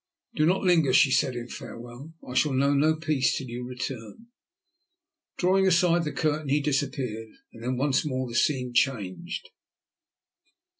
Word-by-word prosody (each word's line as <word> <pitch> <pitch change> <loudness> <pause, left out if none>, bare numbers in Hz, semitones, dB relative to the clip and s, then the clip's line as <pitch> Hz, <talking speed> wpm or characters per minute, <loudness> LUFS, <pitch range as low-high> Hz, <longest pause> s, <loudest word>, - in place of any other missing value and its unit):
"Do 155 0 +2
not 185 +3 +1
linger," 165 -8 +3
she 135 +1 +5
said 130 -2 +2
in 120 0 -5
farewell. 120 +7 -10
"I 125 - -6
shall 145 +2 +2
know 140 +2 +2
no 155 +3 +3
peace 155 -5 0
till 135 - -5
you 120 +1 -6
return." 125 - -7 1.1
Drawing 190 +1 +3
aside 170 -1 +3
the 150 - -2
curtain 155 -2 -1
he 145 +2 +3
disappeared, 135 -6 -2 0.2
and 115 - -13
then 125 +2 -2
once 135 +1 +1
more 130 -4 -2
the 120 - -8
scene 125 0 +1
changed. 115 -7 -1
135 Hz, 155 wpm, -26 LUFS, 125-155 Hz, 1.1 s, she